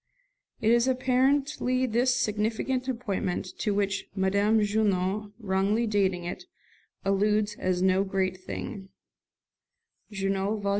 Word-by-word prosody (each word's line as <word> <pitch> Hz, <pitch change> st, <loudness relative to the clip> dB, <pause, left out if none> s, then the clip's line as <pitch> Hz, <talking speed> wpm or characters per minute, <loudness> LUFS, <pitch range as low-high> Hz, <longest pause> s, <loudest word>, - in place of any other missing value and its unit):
It 220 Hz, -, +3 dB
is 235 Hz, +1 st, +4 dB
apparently 260 Hz, 0 st, +1 dB
this 245 Hz, +2 st, +2 dB
significant 225 Hz, +3 st, -1 dB
appointment 210 Hz, -8 st, -2 dB
to 210 Hz, -, 0 dB
which 200 Hz, -1 st, -1 dB
Madame 200 Hz, +3 st, +2 dB
Junot, 205 Hz, -1 st, 0 dB
wrongly 205 Hz, +1 st, +1 dB
dating 195 Hz, -4 st, +1 dB
it, 175 Hz, -, -6 dB, 0.6 s
alludes 210 Hz, +2 st, +2 dB
as 185 Hz, -1 st, 0 dB
"no 190 Hz, +1 st, +3 dB
great 190 Hz, -1 st, -1 dB
thing" 190 Hz, +1 st, -7 dB, 1.2 s
(Junot, 195 Hz, +1 st, -1 dB
vol. 200 Hz, -, 0 dB
205 Hz, 110 wpm, -27 LUFS, 195-235 Hz, 1.2 s, is